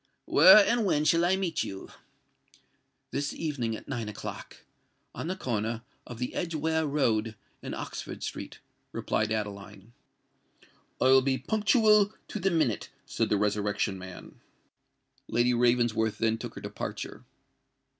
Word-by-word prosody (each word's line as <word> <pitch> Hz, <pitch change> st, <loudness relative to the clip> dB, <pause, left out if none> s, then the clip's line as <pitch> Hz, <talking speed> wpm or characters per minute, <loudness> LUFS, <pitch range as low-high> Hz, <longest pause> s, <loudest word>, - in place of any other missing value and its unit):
"Where 190 Hz, +6 st, +8 dB
and 235 Hz, -1 st, +2 dB
when 155 Hz, -6 st, +1 dB
shall 165 Hz, +2 st, +4 dB
I 185 Hz, +2 st, +3 dB
meet 190 Hz, -3 st, -1 dB
you?" 95 Hz, 0 st, -8 dB, 1.2 s
"This 140 Hz, +1 st, -2 dB
evening, 130 Hz, -8 st, -2 dB
at -, -, -11 dB
nine 120 Hz, -5 st, -3 dB
o'clock—at 105 Hz, +8 st, -10 dB
the 185 Hz, -, -2 dB
corner 115 Hz, -, -2 dB, 0.2 s
of 120 Hz, -, -8 dB
the 125 Hz, +1 st, -4 dB
Edgeware 160 Hz, -1 st, -1 dB
Road 115 Hz, -6 st, 0 dB, 0.3 s
and -, -, -5 dB
Oxford -, -, -6 dB
Street," -, -, -6 dB, 0.4 s
replied 110 Hz, 0 st, -1 dB
Adeline. 105 Hz, 0 st, -5 dB, 1.1 s
"I -, -, +1 dB
will 130 Hz, +1 st, +6 dB
be 130 Hz, 0 st, +1 dB
punctual 210 Hz, -, +3 dB
to 215 Hz, -, -4 dB
the 195 Hz, +1 st, +2 dB
minute," 155 Hz, -, 0 dB, 0.2 s
said -, -, -1 dB
the 105 Hz, -, +2 dB
Resurrection 105 Hz, -1 st, 0 dB
Man. 95 Hz, -1 st, -11 dB, 0.9 s
Lady 120 Hz, +2 st, +2 dB
Ravensworth 120 Hz, -2 st, +2 dB
then 115 Hz, 0 st, +1 dB
took -, -, -7 dB
her -, -, -8 dB
departure. -, -, -6 dB
125 Hz, 135 wpm, -28 LUFS, 110-165 Hz, 1.2 s, Where